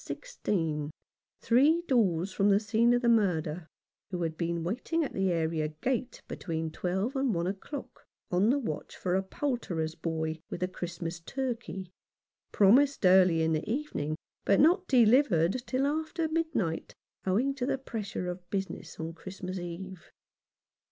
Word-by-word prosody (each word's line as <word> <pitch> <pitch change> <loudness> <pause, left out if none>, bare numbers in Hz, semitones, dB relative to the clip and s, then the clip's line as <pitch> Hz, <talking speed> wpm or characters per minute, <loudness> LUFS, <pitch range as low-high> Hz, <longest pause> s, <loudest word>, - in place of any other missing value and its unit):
16, 165 - -2 0.5
three 295 +8 +4
doors 190 -8 +2
from 200 +2 +3
the 200 0 +5
scene 220 +3 +3
of 245 +1 +2
the - - +3
murder, 175 -7 +2 0.4
who 180 -2 -2
had 160 -1 -2
been 170 0 -2
wait 215 - -4
ing 330 0 +3
at 285 - -4
the 190 -1 +1
area 160 -2 0
gate 240 +11 -3
between 160 -2 -3
twelve 190 - -2
and 265 -6 +1
one 170 0 0
o'clock, 200 +9 -6 0.2
on 185 +5 +3
the 270 - +4
watch 185 - -4
for 180 - -1
a 190 - +3
poulterer's 190 - -2
boy 160 -1 -3
with 175 - -6
the 180 - +1
Christmas 175 -1 -5
turkey, 230 -3 -4 0.6
promised 255 +5 +5
early 180 -3 +6
in 160 0 +2
the 155 +5 -2
evening, 230 - -2 0.3
but 200 - +3
not 355 +5 +4
delivered 240 - +4
till 260 +1 +1
after 315 +3 -1
midnight, 315 - -1 0.3
owing 240 +9 +2
to 260 -2 -3
the - - +1
pressure 220 -8 -5
of 180 0 -6
business 195 -1 -4
on 160 +1 -4
Christmas 185 +1 -6
Eve. 175 +1 -7
190 Hz, 155 wpm, -30 LUFS, 170-255 Hz, 0.6 s, early